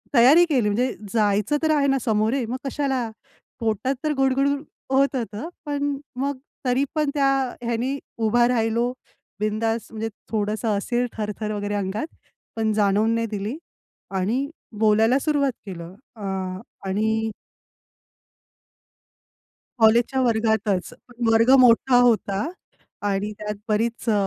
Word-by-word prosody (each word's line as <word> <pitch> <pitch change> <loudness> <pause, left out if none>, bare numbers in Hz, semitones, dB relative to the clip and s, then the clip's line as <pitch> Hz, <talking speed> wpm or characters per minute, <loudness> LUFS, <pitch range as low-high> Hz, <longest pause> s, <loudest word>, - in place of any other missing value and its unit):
तयारी 280 +9 +7
केली 255 -10 +1
म्हणजे 245 +5 0 0.2
जायचं 210 +5 +2
तर 315 - +3
आहे 280 -1 +2
ना 270 -1 +2
सामोरे, 225 +2 +1
मग 250 +3 -3
कशाला? 265 -4 -1 0.5
पोटात 225 +4 0
तर 305 -1 +1
गुडगुड 270 +1 +3 0.4
होत 275 +1 +3
होतं. 235 +5 -4 0.2
पण 285 -1 -1 0.2
मग 280 +1 -1 0.3
तरी 255 +2 +2
पण 300 -2 +1
त्या 280 -2 +2 0.4
ह्यानी 240 +4 -1 0.2
उभा 235 +2 +3
राहिलो, 235 0 +1 0.5
बिंदास 220 +1 -1
म्हणजे 225 0 -3 0.2
थोडंसं 210 0 0
असेल 240 +4 0
थरथर 210 0 -3
वगैरे 205 0 -2
अंगात, 205 +8 -2 0.5
पण 220 -1 0
जाणवून 210 +2 +2
नाही 230 0 0
दिली 210 +7 -3 0.6
आणि 250 +9 0 0.3
बोलायला 220 +4 +4
सुरुवात 285 -2 +1
केलं. 175 -2 -8 0.2
अं, 190 -2 -4 0.3
आणि 220 +3 0 2.5
कॉलेजच्या 235 +4 +4
वर्गातच. 220 -5 +1 0.2
पण 240 -1 -3
वर्ग 230 +3 +4
मोठा 245 +1 +5
होता 215 -2 +2 0.6
आणि 200 +1 -1
त्यात 210 0 -4
बरीच 230 +3 0
अ, - - +4
230 Hz, 125 wpm, -23 LUFS, 210-260 Hz, 2.5 s, तयारी